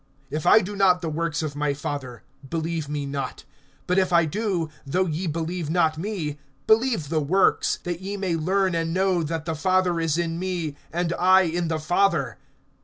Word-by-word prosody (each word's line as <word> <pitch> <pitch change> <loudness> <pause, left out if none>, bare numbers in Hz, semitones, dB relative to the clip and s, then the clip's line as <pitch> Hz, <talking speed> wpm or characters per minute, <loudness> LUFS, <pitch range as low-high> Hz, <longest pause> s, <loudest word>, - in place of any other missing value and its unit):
(37)If 155 +1 -3
I - - +8
do 205 +3 -5
not 185 -2 +4
the 165 - -1
works 165 0 -1
of 145 -2 -4
my 145 -1 0
Father, 135 -4 -5 0.3
believe 165 -2 -2
me 145 -1 -2
not. 140 -2 -4 0.4
(38)But 180 - +1
if 185 -1 +1
I 170 -1 +5
do, 185 -1 -1 0.2
though 180 +7 0
ye 170 +2 -2
believe 165 +1 -3
not 160 -2 +2
me, 165 -7 -3 0.3
believe 220 - +2
the 155 -1 +1
works; 185 +7 +2
that 175 0 -4
ye 200 +2 -4
may 190 -4 -1
learn 185 +3 +1
and 165 0 -1
know, 190 -2 +2
that 160 0 -3
the 165 - -1
Father 185 +1 +1
is 165 -1 0
in 170 -1 -1
me, 175 -5 -3 0.2
and 170 0 -1
I 185 +1 +6
in 175 -1 -1
the 160 -1 -1
Father. 170 -1 +1
170 Hz, 190 wpm, -24 LUFS, 155-185 Hz, 0.4 s, I